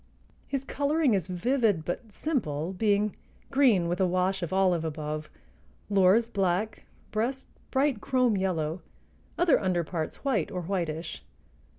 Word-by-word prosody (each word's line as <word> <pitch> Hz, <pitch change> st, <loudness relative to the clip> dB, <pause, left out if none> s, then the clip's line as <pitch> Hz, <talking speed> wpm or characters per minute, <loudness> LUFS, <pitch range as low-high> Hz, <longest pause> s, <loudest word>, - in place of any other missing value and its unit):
His 275 Hz, -2 st, -2 dB
coloring 285 Hz, -1 st, +1 dB
is 190 Hz, -4 st, 0 dB
vivid 205 Hz, -, +1 dB
but 215 Hz, +5 st, -4 dB
simple, 180 Hz, -, -2 dB
being 205 Hz, +1 st, +1 dB, 0.4 s
green 235 Hz, -11 st, +4 dB
with 175 Hz, +2 st, -1 dB
a 185 Hz, -, +4 dB
wash 185 Hz, +2 st, 0 dB
of 170 Hz, -, -3 dB
olive 185 Hz, -3 st, +2 dB
above, 155 Hz, -1 st, -4 dB, 0.6 s
lores 200 Hz, +4 st, +5 dB
black, 200 Hz, -1 st, -1 dB, 0.3 s
breast 245 Hz, +5 st, -1 dB, 0.2 s
bright 265 Hz, -4 st, +1 dB
chrome 255 Hz, -4 st, +2 dB
yellow, 175 Hz, -3 st, -1 dB, 0.6 s
other 345 Hz, -4 st, +4 dB
under 180 Hz, -3 st, +1 dB
parts 160 Hz, -, -5 dB
white 220 Hz, -, +1 dB
or 180 Hz, -1 st, -4 dB
whitish. 170 Hz, -3 st, -3 dB
190 Hz, 130 wpm, -28 LUFS, 175-240 Hz, 0.6 s, lores